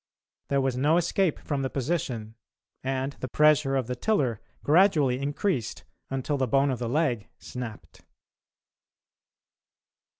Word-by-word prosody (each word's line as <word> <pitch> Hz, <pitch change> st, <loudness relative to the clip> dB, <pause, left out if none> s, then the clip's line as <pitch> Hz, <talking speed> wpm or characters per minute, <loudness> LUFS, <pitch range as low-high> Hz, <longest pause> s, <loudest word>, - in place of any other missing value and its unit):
There 140 Hz, -1 st, +1 dB
was 130 Hz, -2 st, 0 dB
no 150 Hz, +6 st, +3 dB
escape 175 Hz, 0 st, +1 dB
from 145 Hz, -2 st, -3 dB
the 135 Hz, -, -1 dB
position, 125 Hz, -7 st, -2 dB, 0.5 s
and 135 Hz, +1 st, -1 dB
the 130 Hz, -, -4 dB
pressure 150 Hz, 0 st, +4 dB
of 130 Hz, -3 st, +1 dB
the 125 Hz, +2 st, -3 dB
tiller 125 Hz, -, 0 dB, 0.2 s
gradually 150 Hz, -6 st, +4 dB
increased 140 Hz, -, -2 dB, 0.3 s
until 135 Hz, +2 st, -1 dB
the 130 Hz, -1 st, 0 dB
bone 135 Hz, +3 st, +3 dB
of 125 Hz, -, -3 dB
the 120 Hz, -2 st, -2 dB
leg 130 Hz, -6 st, 0 dB
snapped. 120 Hz, -4 st, -8 dB
135 Hz, 130 wpm, -27 LUFS, 125-150 Hz, 0.5 s, pressure